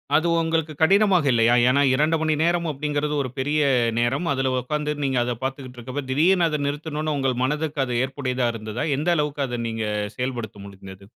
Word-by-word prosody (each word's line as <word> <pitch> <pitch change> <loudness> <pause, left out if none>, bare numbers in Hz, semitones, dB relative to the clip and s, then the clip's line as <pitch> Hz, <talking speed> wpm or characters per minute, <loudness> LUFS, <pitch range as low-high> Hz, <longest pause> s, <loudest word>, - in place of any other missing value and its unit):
அது 160 +3 +3
உங்களுக்கு 160 -1 -1
கடினமாக 195 -1 +4
இல்லையா? 120 0 +4 0.2
ஏன்னா 140 +2 +3
2 155 +4 +2
மணி 155 -1 +1
நேரம்' 170 0 +1
அப்படீங்கிறது 150 +1 -2
ஒரு 130 - -5
பெரிய 145 +3 0 0.4
நேரம்.அதுல 135 +1 0
உட்கார்ந்து 150 +3 -2
நீங்க 135 -2 0
அதை 120 0 -2
பார்த்துக்கிட்ருக்கும் 130 -1 -6
போது, 140 -2 -3
திடீர்னு 170 +5 +3
அதை 150 -1 -2
நிறுத்தணும்ன்னு 150 +1 -3
உங்கள் 130 -3 -1
மனதுக்கு 150 +1 -1
அது 125 -1 -3
ஏற்புடையதா 130 -2 -2
இருந்ததா? 110 +5 -4
எந்த 155 +5 0
அளவுக்கு 150 -1 -1
அத 120 -1 -4
நீங்க 110 -1 -3 0.3
செயல்படுத்த 120 -5 -4
முடிந்தது? 95 0 -12
140 Hz, 165 wpm, -23 LUFS, 125-155 Hz, 0.4 s, கடினமாக